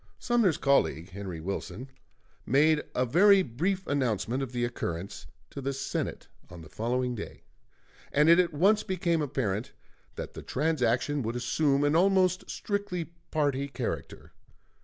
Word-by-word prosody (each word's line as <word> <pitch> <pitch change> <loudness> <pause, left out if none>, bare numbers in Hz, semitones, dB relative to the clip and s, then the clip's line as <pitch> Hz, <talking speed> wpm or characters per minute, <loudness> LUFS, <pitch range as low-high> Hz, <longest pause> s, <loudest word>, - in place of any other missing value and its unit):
Sumner's 230 - +2
colleague, 95 - +1
Henry 95 -3 -6
Wilson, 100 +6 -5 0.6
made 150 +4 +3
a 125 - +2
very 190 - +5
brief 180 +10 -2
announcement 130 -2 -1
of 135 -3 -4
the 120 -1 -1
occurrence 95 -6 -5 0.2
to 140 - -6
the 135 +1 -2
Senate 135 0 -4 0.2
on 85 -1 -10
the 80 - -13
following 125 +2 -1
day, 110 - -8 0.7
and 150 +2 +4
it 170 +2 +7
at 175 -1 +3
once 195 +8 +3
became 175 -4 0
apparent 120 -7 -2 0.4
that - - -6
the - - -8
transaction 145 -1 0
would 115 0 -3
assume 140 +3 +1
an 145 +1 +2
almost 185 0 +3
strictly 190 -5 -3 0.2
party 140 -3 0
character. 130 -4 -5
140 Hz, 140 wpm, -28 LUFS, 120-170 Hz, 0.7 s, it